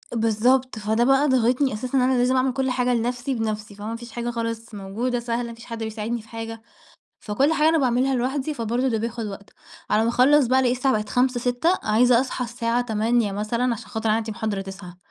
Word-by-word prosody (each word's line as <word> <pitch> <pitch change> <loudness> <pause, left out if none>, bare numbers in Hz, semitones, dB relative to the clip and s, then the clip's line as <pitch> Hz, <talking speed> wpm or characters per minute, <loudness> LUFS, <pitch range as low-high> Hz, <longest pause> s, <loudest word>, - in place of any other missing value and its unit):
بالضبط، 230 +2 +2
فده 220 +2 +1
بقى 270 +3 +4
ضاغطني 260 +1 +2
أساسًا 250 +5 -2
إن - - +4
أنا 260 +1 +3
لازم 250 +1 +2
أعمل 260 0 +2
كُلّ 265 0 0
حاجة 250 0 +1
لنَفْسي 245 +3 -1
بنَفْسي، 215 -2 -3
فما 210 +3 -5
فيش 235 0 -10
حاجة 240 +1 -3
خالص 230 -1 -4
موجودة 220 +6 -2
سهلة، 235 0 -3
فيش 230 0 -13
حد 230 -1 -7
بيساعدني 220 +1 -3
في 220 - -20
حاجة. 225 0 -7 0.6
فكُلّ 265 +9 +1
حاجة 310 -1 +3
أنا 325 0 +3
باعملها 260 0 +2
لوحدي، 265 +4 -1
فبرضه 240 +1 -1
ده 225 -3 0
بياخد 230 0 -3
وقت. 200 0 -9 0.4
على 210 +1 +3
ما 225 - +1
أخلّص 260 +4 +4
بقى 260 +2 +3
ألاقي 250 -2 +2
الساعة 260 +1 +1
بقت 210 0 -5
17:00، 250 +2 +1
18:00، 250 +9 +1
عايزة 235 +3 +4
أصحى 255 -1 -3
الساعة 235 0 -1
08:00 225 -2 +1
مثلًا 230 +5 -1
عشان 225 - -10
خاطر 220 -2 -2
عندي 220 +1 0
محاضرة 215 -3 -3
09:00. 190 -2 -9
235 Hz, 205 wpm, -23 LUFS, 220-255 Hz, 0.6 s, بقى